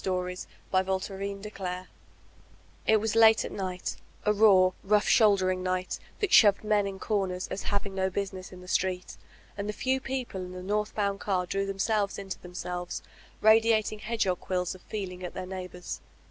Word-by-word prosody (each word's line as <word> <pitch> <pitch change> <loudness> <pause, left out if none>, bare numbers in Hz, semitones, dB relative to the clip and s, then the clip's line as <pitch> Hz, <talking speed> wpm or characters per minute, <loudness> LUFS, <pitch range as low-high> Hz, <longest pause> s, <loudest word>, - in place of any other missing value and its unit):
Where 180 -1 -1
the 180 - -8 0.2
White 185 0 +2 0.2
Rose 195 0 -5
Died 185 -3 -5 1.0
IT 220 - +6
was 220 0 -1
late 225 -1 +6
at - - -6
night, 185 -2 -4 0.3
a 210 - +4
raw, 195 -3 +6
rotigk^houlderifig 200 -2 +4
night, 185 0 -2 0.2
that 415 - +1
shoved 205 -2 +7
men 210 -1 +2
in 195 -1 -5
corners 190 -4 -1
as 195 - -4
having 200 -1 -2
no 190 0 0
business 190 -1 -4
in 180 -1 -11
the 180 - -12
street, 185 -1 -1 0.4
and 205 +1 -4
the - - -1
few 260 +4 0
people 255 -8 -4
in 180 0 -7
the 180 0 -7
northboimd 210 -1 0
car 185 -3 0
drew 195 +2 -1
themselves 200 +1 0
into 195 -1 -6
themselves, 180 0 -5 0.4
radiating 220 -1 +4
hedgdiog 215 -5 0
quiUs 180 -1 -2
of 185 - -13
feeling 185 -3 -5
at 180 - -6
their 185 - -4
neighbors. 180 -1 -6
195 Hz, 170 wpm, -29 LUFS, 185-210 Hz, 1.0 s, shoved